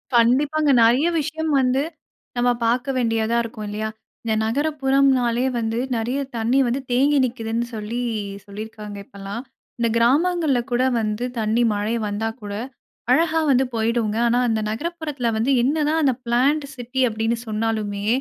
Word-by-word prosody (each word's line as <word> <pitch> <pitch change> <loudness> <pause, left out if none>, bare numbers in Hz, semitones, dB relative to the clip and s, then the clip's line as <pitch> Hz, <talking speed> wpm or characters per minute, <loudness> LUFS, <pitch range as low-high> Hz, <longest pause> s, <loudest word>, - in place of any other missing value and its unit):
கண்டிப்பாங்க. 285 +6 +3
நிறைய 250 +8 +4
விஷயம் 315 +1 -2
வந்து, 260 +1 +2 0.6
நம்ம 245 +1 +3 0.2
பார்க்க 245 +4 +1
வேண்டியதா 225 -1 +1
இருக்கும், 220 -2 -7
இல்லயா? 215 +1 -3 0.3
இந்த 225 -1 0
நகரப்புறம்னாலே 270 -2 +2
வந்து 225 0 -2 0.2
நிறைய 240 +5 -1 0.2
தண்ணீ 235 +4 +2
வந்து 245 +3 0
தேங்கி 280 +4 +3
நிக்கிதுன்னு 230 -1 -2
சொல்லி 220 +3 -4 0.5
சொல்லியிருக்காங்க 210 0 -8
இப்பல்லாம். 200 +4 -7 0.4
இந்த 235 -1 +2
கிராமங்கள்லகூட 265 -2 +2 0.2
வந்து 215 +1 -2 0.2
தண்ணீ 220 +2 +1
மழை 210 +3 -1
வந்தா 210 +2 -2
கூட, 205 -1 -6 0.6
அழகா 325 +3 +3
வந்து 265 0 +4
போயிடுங்க. 225 -1 0
ஆனா, 240 +1 +2
அந்த 220 -1 +1
நகரப்புறத்தில 295 -1 -3
வந்து 225 +5 +1
என்னதான் 305 +3 +1
அந்த 270 -3 +3
பிளான்டு 280 +5 +2
சிட்டி 250 +1 -2
அப்டீன்னு 225 +1 -1
சொன்னாலுமே, 215 -2 -2
240 Hz, 130 wpm, -22 LUFS, 220-275 Hz, 0.6 s, நிறைய